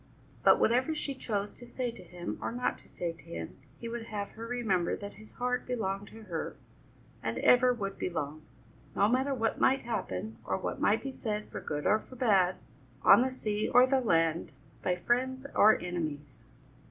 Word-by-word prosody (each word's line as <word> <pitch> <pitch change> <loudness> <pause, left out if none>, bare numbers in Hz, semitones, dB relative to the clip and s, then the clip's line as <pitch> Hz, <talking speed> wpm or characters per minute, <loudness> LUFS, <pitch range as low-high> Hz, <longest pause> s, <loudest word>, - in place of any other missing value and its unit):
But - - +6
whatever 255 +7 +3
she 285 -2 -2
chose 205 -6 -3
to 245 - -12
say 245 0 -2
to 230 - -12
him 175 -1 -6
or - - -2
not 245 +1 -1
to - - -17
say 175 -1 -3
to 165 -3 -16
him, 85 -1 -7 0.2
he 235 - -6
would 230 0 -4
have 205 -3 -4
her 230 +1 -8
remember 215 -8 0
that 200 0 -7
his 215 - -15
heart 250 0 -1
belonged 200 -5 -2
to 225 +2 -12
her, 170 -6 -4 0.7
and - - -2
ever 250 0 +5
would 195 -5 -4
belong, 155 -3 -3 0.5
no 200 - +4
matter 265 +4 +1
what 225 -2 -1
might 270 +1 +4
happen 110 - -3
or 95 - -1
what - - -4
might 215 - +3
be 270 - -3
said 215 -5 -4
for - - -6
good 150 0 -4
or 215 - +4
for 255 - -14
bad, 195 -7 +3 0.5
on - - +8
the 260 - +2
sea 215 -5 -2
or 250 +1 +8
the 265 0 +2
land, 165 -6 +1 0.3
by 180 - +1
friends 260 +7 0
or 215 +1 +6
enemies. 150 -9 -5
215 Hz, 190 wpm, -31 LUFS, 180-245 Hz, 0.7 s, on